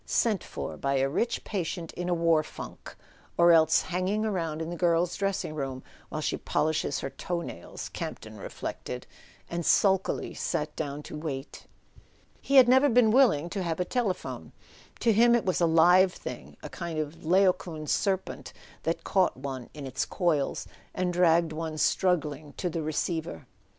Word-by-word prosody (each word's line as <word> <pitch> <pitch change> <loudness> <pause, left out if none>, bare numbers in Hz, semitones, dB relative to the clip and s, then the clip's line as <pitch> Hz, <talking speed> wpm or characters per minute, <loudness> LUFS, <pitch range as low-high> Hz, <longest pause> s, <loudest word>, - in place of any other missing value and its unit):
"Sent 215 -6 +1
for - - -6
by 140 0 0
a 135 0 +2
rich 230 - -1
patient 170 -4 -4
in 175 0 -4
a - - +2
war 165 -2 +3
funk; - - -10 0.4
or 170 0 +6
else 160 -1 +5
hanging 185 +4 -1
about 165 -7 -2
in 165 +1 -4
the - - -4
girl's 170 0 +2
dressing 195 -5 -2
room 135 -3 -4 0.3
while - - -4
she - - -1
polishes 155 -3 0
her 135 - -4
toe 175 -1 -3
nails," - - -7
Campton - - -7
reflected; - - -6 0.4
and 170 0 -3
sulkily 190 +2 +2
sat 150 0 -2
down 145 -1 -4
to - - -8
wait. 150 -3 -6 0.7
He 275 - 0
had 260 -2 +9
never 260 +3 +5
been 235 -2 +5
willing 225 - +4
to 200 - -2
have 170 -2 -2
a 180 - +1
telephone. 215 -2 -3 0.5
To 230 - +4
him 235 +3 +5
it 235 - 0
was 185 -1 0
a 170 - +5
live 175 +3 +5
thing, - - -8
a - - -6
kind 170 -3 -5
of 155 +1 -4
Laocoon 175 -2 +2
serpent 190 +4 -1 0.3
that 165 +1 -2
caught 190 -7 +2
one 130 -2 -6
in 145 -2 -7
its 130 +1 -2
coils 160 -6 0 0.3
and 180 -1 0
dragged 170 -2 +3
one 160 0 -4
struggling 155 -5 0
to 180 - -3
the 165 - -2
receiver. 155 - -3
170 Hz, 170 wpm, -28 LUFS, 155-190 Hz, 0.7 s, had